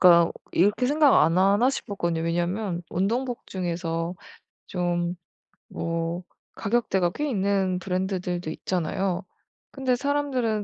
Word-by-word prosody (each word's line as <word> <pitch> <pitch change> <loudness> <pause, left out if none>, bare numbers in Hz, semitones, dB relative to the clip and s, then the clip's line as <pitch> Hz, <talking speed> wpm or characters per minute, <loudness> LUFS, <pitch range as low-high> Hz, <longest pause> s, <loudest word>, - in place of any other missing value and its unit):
그러니까 170 -2 +7 0.2
'이렇게 205 +8 +3
생각 290 0 +5
안 165 +3 +3
하나?' 200 +7 +4
싶었거든요. 170 -10 -2
왜냐하면 175 +2 -1
운동복 235 +7 -1
중에서 170 -1 -2 0.5
좀 175 -1 -1 0.6
뭐 165 +1 -2 0.3
가격대가 195 -5 +1
꽤 295 +6 -2
있는 195 -4 +1
브랜드들도 180 -2 -2
있잖아요. 180 +2 -1 0.5
근데 265 -2 0
사람들은 260 -5 0
185 Hz, 290 characters per minute, -26 LUFS, 175-225 Hz, 0.6 s, 그러니까